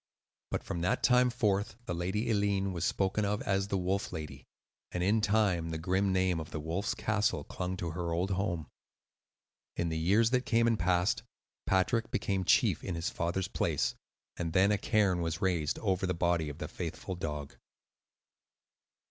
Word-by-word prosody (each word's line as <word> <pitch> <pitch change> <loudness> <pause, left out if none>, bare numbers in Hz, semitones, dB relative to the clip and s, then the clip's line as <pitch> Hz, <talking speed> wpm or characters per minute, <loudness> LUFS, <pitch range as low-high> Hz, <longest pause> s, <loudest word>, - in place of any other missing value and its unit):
But - - -2
from 85 - -4
that 90 - 0
time 125 0 +5
forth 105 -3 0
the - - -3
Lady 95 +7 -1
Eileen 100 -3 +1
was 85 -1 -3
spoken 100 +2 +1
of 105 +1 -1
as 95 0 0
"The 100 - 0
Wolf 95 +2 -1
Lady," 70 -4 -7 0.4
and 90 - -1
in 105 +4 +3
time, 105 -6 +2
the 80 - -3
grim 95 +4 +1
name 95 -2 +2
of 80 - -6
the 80 - -4
"Wolf's 85 +6 -2
Castle" 110 +1 0
clung 90 0 -4
to 85 -2 -3
her 85 0 -3
old 90 +4 0
home. 90 -4 -1 1.1
In 85 - 0
the 80 0 -2
years 105 +8 +3
that 125 -1 +2
came 115 -1 +3
and 115 -2 +2
passed, 90 +4 +2 0.5
Patrick 110 +5 +2
became 95 -2 -1
chief - - +3
in 90 - -3
his 85 0 -2
father's 85 +3 -1
place; - - 0 0.4
and 85 -2 -3
then 95 +3 +5
a 105 - +3
cairn 100 -6 +2
was 85 0 -2
raised 85 -6 0
over 95 -3 0
the 90 - 0
body 85 -2 +1
of 75 - -8
the - - -5
faithful 95 - -5
dog. 75 -5 -5
95 Hz, 180 wpm, -31 LUFS, 85-105 Hz, 1.1 s, time